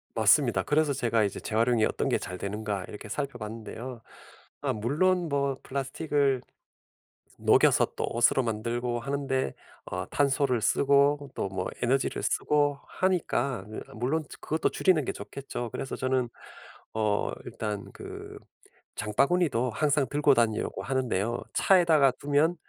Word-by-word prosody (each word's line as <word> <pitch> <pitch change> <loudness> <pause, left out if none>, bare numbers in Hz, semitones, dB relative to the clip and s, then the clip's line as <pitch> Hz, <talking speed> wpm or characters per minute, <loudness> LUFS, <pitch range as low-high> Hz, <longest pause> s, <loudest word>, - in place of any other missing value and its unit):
맞습니다. - - +4
그래서 150 -1 +2
제가 115 -4 +1
이제 100 - -2
재활용이 115 0 +2
어떤 - - -1
게 - - +2
잘 90 - -6
되는가 100 -1 -3
이렇게 105 +1 -9
살펴봤는데요. 115 -2 -5 0.6
아 - - +1
물론 165 - +1
뭐 140 -2 0
플라스틱을 140 0 0 1.0
녹여서 - - +5
또 - - -1
옷으로 120 +3 +3
만들고 120 +2 -2
하는데 135 0 -1 0.3
어 90 0 -4
탄소를 135 -4 +1
쓰고 140 +4 +3
또 95 - -2
뭐 95 -1 -3
에너지를 130 +2 0
쓰고 145 -1 +1
하니까 150 - 0
이 110 - -6 0.2
물론 135 +8 0
이제 - - -12
그것도 160 +1 0
줄이는 180 -6 +2
게 - - -1
좋겠죠. 130 -3 -6
그래서 135 - -4
저는 130 -2 0 0.6
어 105 -2 0
일단 105 -2 -4
그 - - -9 0.6
장바구니도 125 - +1
항상 145 +2 +1
들고 145 -1 +4
다니려고 115 -2 0
하는데요. 120 -4 -1
차에다가 165 -8 +5
두면 145 +4 +2
130 Hz, 310 characters per minute, -28 LUFS, 110-145 Hz, 1.0 s, 녹여서